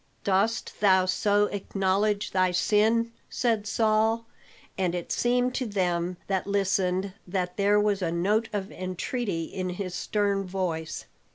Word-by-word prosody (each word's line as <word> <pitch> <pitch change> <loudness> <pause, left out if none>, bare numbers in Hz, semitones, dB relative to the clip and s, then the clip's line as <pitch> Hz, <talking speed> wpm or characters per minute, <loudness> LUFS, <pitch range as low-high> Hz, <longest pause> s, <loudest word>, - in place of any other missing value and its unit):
"Dost 200 +4 0
thou 190 -2 +5
so 205 +2 +2
acknowledge 200 +1 0
thy 185 -1 +3
sin?" 215 +6 +2 0.2
said 225 -4 0
Saul; 220 +1 +2 0.5
and 180 -2 0
it 175 - -5
seemed 245 +1 +1
to 255 -1 -2
them 180 -3 -1
that 190 -1 -1
listened 195 -1 0
that 180 -1 -2
there 205 +1 +3
was 205 -1 +1
a 170 -2 0
note 205 +6 +1
of 200 -2 -3
entreaty 185 0 -3
in 185 +3 -4
his 180 0 -4
stern 200 +1 0
voice. 175 -4 -3
195 Hz, 135 wpm, -27 LUFS, 185-210 Hz, 0.5 s, thou